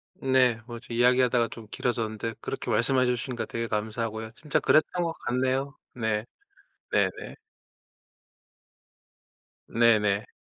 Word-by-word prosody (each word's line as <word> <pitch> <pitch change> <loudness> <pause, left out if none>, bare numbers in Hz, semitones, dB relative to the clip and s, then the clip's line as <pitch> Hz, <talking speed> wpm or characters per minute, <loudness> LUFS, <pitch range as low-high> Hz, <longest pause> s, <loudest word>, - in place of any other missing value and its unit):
네. 130 -3 +3
뭐 120 -2 -7
저 120 - -11
이야기하다가 125 0 +3
좀 115 -2 -10
길어졌는데 115 -2 -2
그렇게 - - -4
말씀해 130 +3 +3
주시니까 125 0 -2
되게 115 0 -3
감사하고요. 110 +1 -3
진짜 150 +1 -1
그랬던 175 +3 +3
것 165 - -1
같네요. 130 +3 -1 0.2
네. 110 -3 -1 0.7
네네. - - 0 2.3
네네. 105 -3 +3
120 Hz, 265 characters per minute, -27 LUFS, 110-130 Hz, 2.3 s, 네